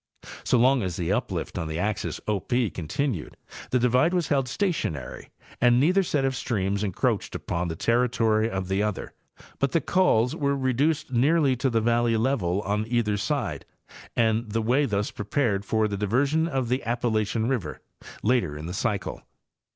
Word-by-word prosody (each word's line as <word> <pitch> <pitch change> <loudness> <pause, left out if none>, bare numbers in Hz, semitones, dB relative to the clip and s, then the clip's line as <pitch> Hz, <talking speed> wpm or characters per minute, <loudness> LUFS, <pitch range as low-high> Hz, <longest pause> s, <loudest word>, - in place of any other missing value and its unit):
So - - +2
long 130 +2 +4
as 90 -4 -3
the 85 +1 -2
uplift 100 -6 -2
on 80 - -3
the 80 0 -4
axis 100 +3 -2
O 105 -2 +1
P 120 +2 0
con 80 -4 -6
tinued 130 - -2 0.4
the 125 - +2
divide 125 +8 +3
was 175 -2 0
held 135 -3 +1
stationary 130 - -3 0.3
and 120 0 +5
neither 180 +8 +4
set 150 -7 0
of 135 0 0
streams 100 -5 -1
encroached 95 -3 -1
upon 85 +1 -2
the 80 - -4
territory 115 0 +2
of 95 -3 -3
the 95 +1 0
other, 105 -2 -3 0.5
but 140 - 0
the 165 - +4
cols 140 -11 +2
were 140 -1 0
reduced 140 +3 0
nearly 140 +2 +3
to 135 +2 +1
the 115 -2 +1
valley 115 0 +2
level 110 -7 0
on 105 +2 -1
either 115 -3 +1
side, 105 - -2 0.5
and 115 0 +1
the 115 0 0
way 130 +6 +2
thus 105 -1 -1
prepared 105 -1 -1
for 110 +1 +1
the 100 -1 -3
diversion 140 +10 +1
of 135 -6 -1
the 125 +3 -1
Appalachian 115 -1 0
river, 115 - -2 0.4
later 105 -11 +1
in 75 - -7
the 90 - -5
cycle. 100 -1 -2
115 Hz, 175 wpm, -26 LUFS, 100-130 Hz, 0.5 s, and